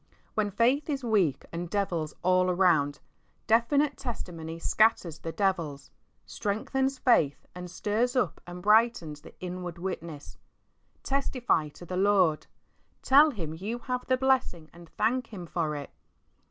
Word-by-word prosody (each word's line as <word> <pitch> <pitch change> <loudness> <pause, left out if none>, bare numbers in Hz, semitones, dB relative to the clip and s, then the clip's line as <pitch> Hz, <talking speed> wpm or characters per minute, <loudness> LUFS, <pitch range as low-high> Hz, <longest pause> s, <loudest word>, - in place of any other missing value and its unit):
When 215 -1 0
faith 245 +9 +1
is 275 -3 -2
weak 200 - +1
and 170 +1 -5
devils 175 -6 -2
all 185 0 +3
around, 170 -6 +2 0.5
definite 280 +6 +2
tesdmony 170 -10 -6
scatters 170 -3 +2
the 165 - -5
devils, 165 -8 -2 0.3
strengthens 265 +6 -2
faith 165 - +2
and 180 0 -8
stirs 220 +7 -1
up 215 - 0
and 175 0 -8
brightens 210 -8 +3
the - - -15
inward 180 -1 -6
witness. 170 -5 -6 0.6
Testify 255 - 0
to 175 - -10
the 180 +1 -4
Lord, 190 -5 +3 0.6
tell 290 +4 +7
Him 170 - -5
you 200 +8 -4
have 250 +1 -4
the 255 - +2
blessing 255 -12 0
and 170 -1 -14
thank 240 +2 +1
Him 185 -5 -8
for 160 -2 -2
it. 145 -1 -7
190 Hz, 140 wpm, -28 LUFS, 165-235 Hz, 0.6 s, tell